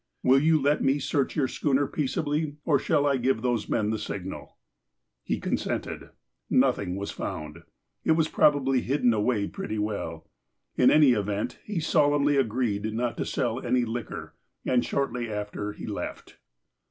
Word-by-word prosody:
Will 130 +2 +6
you 155 +2 +4
let 145 +2 +2
me 135 +2 +3
search 140 -1 -1
your 140 -4 +2
schooner 140 +1 +1
peaceably, 150 +1 -1
or 145 -4 +3
shall 145 +1 +1
I 140 -2 +3
give 125 -2 0
those 120 -4 0
men 110 -2 +1
the 110 - -2
signal? 95 -2 -6 0.3
" - - -55 0.3
He - - -2
consented. - - -3 0.4
Nothing 90 -2 +2
was 100 +1 -4
found. 75 -1 -6 0.4
It 160 - +4
was 160 -1 +2
probably 135 -5 +3
hidden 125 -2 +2
away 105 -1 +1
pretty 110 - -5
well. 100 -6 -3 0.5
In 125 - +5
any 150 -4 +6
event, 105 -2 -1
he 205 -5 -2
solemnly 145 -2 +3
agreed 110 -4 0
not 120 0 -1
to - - -2
sell 120 -1 -1
any 125 0 +2
liquor, 115 -1 -5 0.3
and 125 -1 +2
shortly 125 -4 -2
after 105 0 -4
he - - -9
left. - - -6
125 Hz, 160 wpm, -27 LUFS, 105-145 Hz, 0.5 s, Will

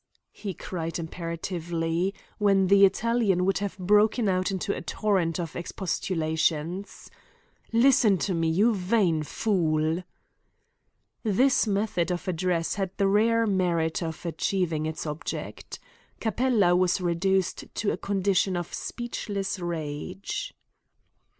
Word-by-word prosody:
he 195 -4 -6
cried 165 -2 -4
imperatively, 170 +1 -2 0.3
when 195 -2 +4
the 200 0 +7
Italian 205 -3 +1
would 195 0 +1
have 200 -2 -4
broken 210 +4 +3
out 185 -1 +1
into 195 +1 -2
a - - -5
torrent 185 -6 0
of 165 -3 -4
expostulations. 170 0 -2 0.6
"Listen 230 -4 +5
to 185 +2 -1
me, 165 -1 +1
you 205 +8 +3
vain 185 -4 +1
fool!" 160 -2 0 1.2
This 240 +3 +3
method 195 -4 0
of 175 0 -3
address 175 -1 0
had 195 -2 -2
the 200 -1 +3
rare 225 +3 +3
merit 175 -5 +1
of 160 0 -5
achieving 170 -2 -1
its 160 +1 -5
object. 150 0 -5 0.4
Capella 220 -5 +2
was 185 0 +2
reduced 185 +1 0
to 205 - 0
a - - -2
condition 195 -2 +1
of 175 -1 -5
speechless 205 -5 -4
rage. 175 - -4
185 Hz, 120 wpm, -27 LUFS, 165-205 Hz, 1.2 s, the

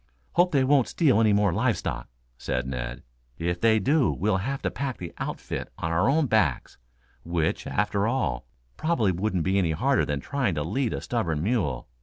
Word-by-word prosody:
"Hope 180 +1 +3
they 140 -3 +3
won't 135 -2 +3
steal 140 - +3
anymore 105 -4 +3
live - - +1
stock," - - -4 0.3
said 65 +1 -3
Ned. 60 -2 -5 0.3
"If 85 +1 -2
they 110 -1 +5
do 135 +6 +2
we'll 105 0 0
have 135 +8 -3
to - - 0
pack 140 -3 -3
the 85 -2 -7
outfit - - -5
on 80 - -3
our 90 +9 +2
own 155 +2 +3
backs, 110 - 0 0.4
which, 85 -1 -1
after 105 0 0
all, 65 - -1 0.3
probably 145 - +1
wouldn't 95 -1 -1
be 95 +3 +2
any 85 -4 +1
harder 130 - +2
than 70 -1 -2
trying 130 - -1
to 75 - -1
lead 115 - -1
a - - -5
stubborn 85 -11 -1
mule. 95 - -1
100 Hz, 185 wpm, -26 LUFS, 85-130 Hz, 0.4 s, they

